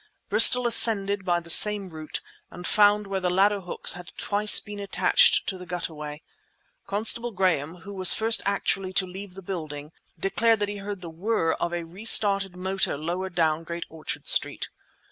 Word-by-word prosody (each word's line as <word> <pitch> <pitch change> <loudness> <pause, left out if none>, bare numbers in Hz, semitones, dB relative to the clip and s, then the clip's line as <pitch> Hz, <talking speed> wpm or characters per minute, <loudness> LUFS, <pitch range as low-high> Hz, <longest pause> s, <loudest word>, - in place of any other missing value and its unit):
Bristol 230 +4 +5
ascended 205 -4 +4
by 175 -2 0
the 170 0 -3
same 205 +1 +5
route, 155 -2 -8 0.3
and 180 +1 -11
found 210 +1 +2
where 195 -1 -4
the 180 -1 -2
ladder 200 +2 +1
hooks 180 - -2
had 175 -2 -12
twice 210 +1 +2
been 205 0 -10
attached 200 0 +3
to 190 - -4
the 180 - -10
gutterway. 150 -4 -7 0.6
Constable 220 +4 0
Graham, 180 -5 -2
who 200 - -9
was 185 -1 +6
first 225 +1 +2
actually 195 -1 -3
to 185 - +2
leave 185 +1 -11
the 195 - -11
building, 155 -5 -8 0.3
declared 225 +4 0
that 205 - -2
he 205 - -7
heard 200 -1 -8
the 170 - -9
whirr 175 0 -2
of 170 - -4
a 175 -1 -5
re 180 +6 -13
started 200 -4 +3
motor 190 -3 -2
lower 175 +5 -5
down 165 -2 -1
Great 170 +1 -7
Orchard 160 -1 -8
Street. - - +1
190 Hz, 180 wpm, -24 LUFS, 170-205 Hz, 0.6 s, was